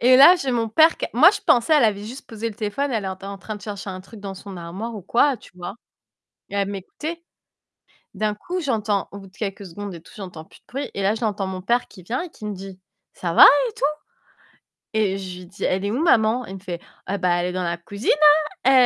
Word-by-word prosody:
Et 255 +2 +7
là 285 +7 +10
j'ai 275 -6 -2
mon 230 -2 0
père 315 +9 +5
q - - -2
moi 300 +11 +8
je 415 - -4
pensais 245 +6 +4
elle 290 - +5
avait 205 -2 +1
juste 250 +6 -9
posé 225 0 -4
le 220 - -9
téléphone, 225 +7 -2
elle 220 -3 -1
était 190 0 -5
en 200 0 -6
train 215 +2 -6
de 205 - -13
chercher 205 -2 -6
un 185 0 -6
truc 205 +3 -13
dans 195 -1 -6
son 195 0 -9
armoire 185 +7 -6
ou 205 - -7
quoi, 255 +8 +3
tu - - -17
vois? 180 +2 -6 0.7
Et - - -9
elle 200 -1 +1
m'écoutait. 300 - -6 0.9
D'un 210 +1 0
coup 355 - -4
j'entends 215 - 0
au 200 - -8
bout 195 - -12
de 185 - -21
quelques 200 -1 -4
secondes 200 +2 -7
et 170 - -9
tout - - -17
j'entends 180 -6 -8
plus - - -19
de - - -47
bruit 275 +3 -4
et 200 - -3
là 200 +2 +3
j'entends 210 -4 -1
mon 185 -1 -5
père 240 +6 +1
qui 185 - -14
vient 235 - -2
et 360 - -7
qui 215 - -11
me 210 - -3
dit: 190 -1 -9 0.3
«Ca 170 -2 -3
va - - +9 0.3
et - - -12
tout?» - - -8 1.1
et 200 -3 +2
je 185 -2 -6
lui 180 - -10
dis: 190 +3 -9
«Elle 190 +2 0
est 205 - 0
où 250 +7 -1
maman?» 240 -5 +3
Il 190 - -8
me - - -8
fait: 180 -3 -6 0.3
«Eh 200 - 0
bah, 180 -2 +2
elle 180 - -1
est - - -2
dans 185 0 -2
la 170 0 -1
cuisine, 200 +6 -5 0.6
hein, 265 - +6
205 Hz, 260 wpm, -23 LUFS, 190-235 Hz, 1.1 s, là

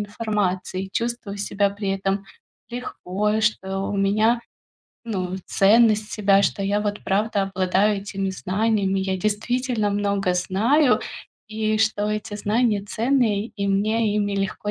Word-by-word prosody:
информации 205 -3 -2
и 190 - -11
чувствую 230 -2 -3
себя 200 0 0
при 200 0 -5
этом 195 0 -1 0.5
легко, 210 -3 -2
что 195 -3 0
у 200 - -2
меня, 215 +4 +2 0.6
ну, 185 -5 -3
ценность 215 +1 +4
себя, 200 -2 +3
что 195 +1 0
я 205 +1 +1
вот 205 0 -3
правда 205 +1 +1
обладаю 195 +2 +1
этими 195 -1 -3
знаниями. 195 +1 0
Я 190 0 -1
действительно 215 +2 -1
много 200 -2 0
знаю, 235 +11 +2 0.5
и 215 0 -1
что 210 -1 +1
эти 215 0 -4
знания 210 0 +1
ценные, 225 -2 +1
и 200 - -1
мне 215 +2 +1
ими 205 -1 0
легко 195 +1 -2
205 Hz, 135 wpm, -23 LUFS, 195-220 Hz, 0.6 s, ценность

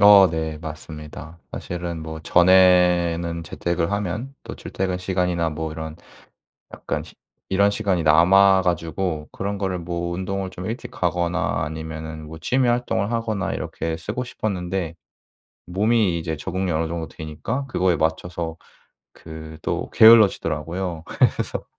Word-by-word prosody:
어 100 -2 +9
네. 80 -1 -3
맞습니다. 75 +1 -9
사실은 85 -2 -5
뭐 80 0 -6
전에는 90 -1 +4
재택을 85 +2 -2
하면 105 +7 -3
또 - - -7
출퇴근 95 -1 -3
시간이나 90 -2 0
뭐 80 0 -4
이런 80 0 -6
시 - - -21 0.7
약간 - - -3 0.5
이런 100 +1 +3
시간이 95 -6 0
남아 95 +5 +6
가지고 85 -2 -2
그런 100 +1 -3
거를 95 -2 -1
뭐 85 0 -3
운동을 95 +1 -3
좀 90 0 -7
일찍 115 +3 -5
가거나 85 0 0
아니면은 80 0 -6
뭐 80 +1 -9
취미 125 +4 +2
활동을 120 -4 0
하거나 110 -5 -1
이렇게 80 0 -3
쓰고 105 +9 -4
싶었는데 95 -7 -3 0.7
몸이 100 -1 +2
이제 80 -1 -3
적응이 95 +3 -2
어느 80 0 0
정도 85 -1 -4
되니까 80 - -4
그거에 90 -9 +1
맞춰서 80 +1 -2 0.6
그 80 -1 -10
또 - - -2
게을러지더라고요. 90 -6 +4
그래서 - - 0
85 Hz, 305 characters per minute, -23 LUFS, 80-95 Hz, 0.7 s, 어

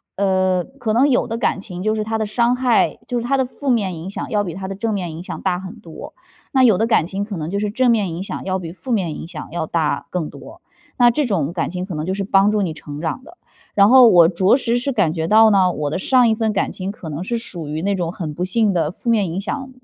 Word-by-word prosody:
呃， 185 -2 +1 0.2
可 220 -4 -1
能 265 +5 +4
有 255 - +2
的 230 0 -3
感 230 - 0
情 185 -2 -6
就 215 +1 +1
是 215 - -2
它 225 0 -2
的 220 - -1
伤 235 +3 +1
害 250 -2 +2
就 245 - -1
是 235 - -5
它 275 +3 +1
的 265 - +1
负 275 +2 -5
面 205 -7 +1
影 165 +3 -7
响 200 - -5
要 210 - +1
比 175 - -5
它 190 +2 -6
的 195 - -5
正 220 +2 -2
面 180 -4 -3
影 160 - -8
响 180 - -7
大 180 - 0
很 190 0 -9
多。 165 -2 -10 0.4
那 260 -1 +4
有 220 -7 +5
的 225 +3 +1
感 190 -8 +3
情 195 +2 -3
可 205 -1 -6
能 160 -1 -4
就 200 - -2
是 210 0 -1
正 245 +3 +2
面 210 -5 +1
影 180 - -4
响 - - -4
要 190 -1 -1
比 170 -3 -7
负 240 +7 -5
面 180 -7 0
影 - - -8
响 165 -3 -8
要 165 -1 -2
大 160 -1 -1
更 175 -4 -3
多， - - -13 0.4
那 245 -1 +6
这 295 +4 0
种 170 - -1
感 170 - -2
情 180 +1 -4
可 185 -4 -6
能 155 +1 -3
就 185 - -2
是 195 0 -2
帮 195 +1 +3
助 210 -1 +1
你 170 -5 -2
成 145 -1 -9
长 170 +10 -3
的。 340 +4 -16 0.4
然 200 0 +6
后 255 0 +8
我 175 -5 +7
着 185 +6 +3
实 240 -3 0
是 250 +3 -1
感 195 - +1
觉 160 -1 -2
到 220 +3 +6
呢， 190 -3 +3
我 150 -4 -3
的 155 - -2
上 250 +5 +3
一 220 - +2
份 220 -1 0
感 200 - 0
情 190 +1 -5
可 180 -5 -9
能 155 +4 -5
是 235 +4 -2
属 175 -9 -5
于 155 +2 -4
那 200 +2 0
种 170 -3 -2
很 160 -5 -5
不 175 +4 -4
幸 205 +1 +1
的 160 -3 0
负 230 +5 -5
面 220 -4 +3
影 180 - -3
响 265 +6 -4
195 Hz, 310 characters per minute, -20 LUFS, 175-230 Hz, 0.4 s, 后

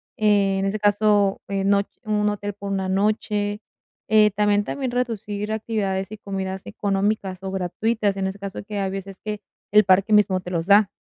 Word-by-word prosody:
en 200 -2 +2
ese 205 +2 -1
caso, 205 -1 +3
en 195 0 0
noch 200 0 +3 0.2
un 210 -2 +1
hotel 205 0 -4
por 200 0 -6
una 190 -1 -1
noche. 205 +1 0 0.5
Eh, 215 -1 +5
también 205 0 +2
también 265 +1 -3
reducir 215 -4 -2
actividades 200 -3 -2
y 215 - -7
comidas 190 -2 -5
económicas, 200 -2 -1
o 190 0 -5
gratuitas, 200 +3 -1
en 190 -1 -1
ese 190 +1 -5
caso, 200 0 -6
que 210 0 -6
hay 195 -1 -1
veces 195 0 -7
que 210 -1 -4 0.3
el 210 0 +6
parque 195 +3 +4
mismo 205 -3 +4
te 180 -1 -8
los 165 -2 -1
da. 205 0 +6
205 Hz, 180 wpm, -23 LUFS, 195-210 Hz, 0.5 s, el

